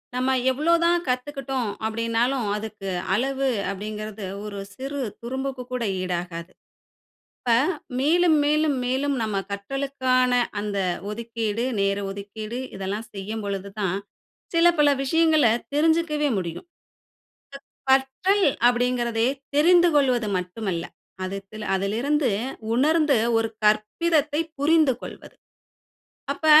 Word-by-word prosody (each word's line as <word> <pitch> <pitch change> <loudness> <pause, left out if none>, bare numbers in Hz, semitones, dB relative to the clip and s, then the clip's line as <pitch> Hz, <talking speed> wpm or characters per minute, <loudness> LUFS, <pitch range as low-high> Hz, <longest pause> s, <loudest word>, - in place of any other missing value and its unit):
நம்ம 260 +1 +1 0.2
எவ்வளோ 305 +6 +2
தான் 345 0 +3
கத்துக்குட்டோம் 265 -2 -2 0.2
அப்டின்னாலும், 230 +2 0
அதுக்கு 210 -2 -6 0.2
அளவு 270 +5 0 0.2
அப்டிங்குறது 210 +1 -6 0.2
ஒரு 200 -1 -6 0.2
சிறு 275 +3 -4 0.2
துரும்புக்கு 265 +1 -4
கூட 250 -1 -1 0.2
ஈடாகாது. 175 -1 -4 0.9
இப்ப 240 -2 +2 0.5
மேலும், 330 +3 +4
மேலும், 300 -1 +2
மேலும் 275 +3 0
நம்ம 215 -2 -2 0.2
கற்றலுக்கான 255 +3 0 0.3
அந்த 205 -1 -3 0.3
ஒதுக்கீடு, 230 0 -3 0.2
நேர 200 0 +2
ஒதுக்கீடு 215 +4 -6 0.2
இதெல்லாம் 195 +3 -4
செய்யும் 210 +3 -5
பொழுது 200 0 -3
தான், 195 -2 0 0.6
சில 335 +1 +5
பல 295 -1 +6
விஷயங்களை 310 -3 +4 0.2
தெரிஞ்சக்கவே 310 -1 +2
முடியும். 175 - -5 1.2
க - - +7
கற்றல் 270 +10 +3 0.2
அப்டிங்கறதே 240 -1 +1 0.3
தெரிந்து 345 +3 +6
கொள்வது 250 -6 +3
மட்டுமல்ல. 180 -1 -3 0.4
அதுத்ல 195 +3 -6
அதிலிருந்து 240 +8 +1 0.4
உணர்ந்து 300 +2 +3 0.2
ஒரு 225 - +1 0.2
கற்பிதத்தை 295 +9 +2 0.2
புரிந்துகொள்வது. 290 -3 +1 1.0
அப்ப 315 - -4
250 Hz, 100 wpm, -24 LUFS, 210-285 Hz, 1.2 s, க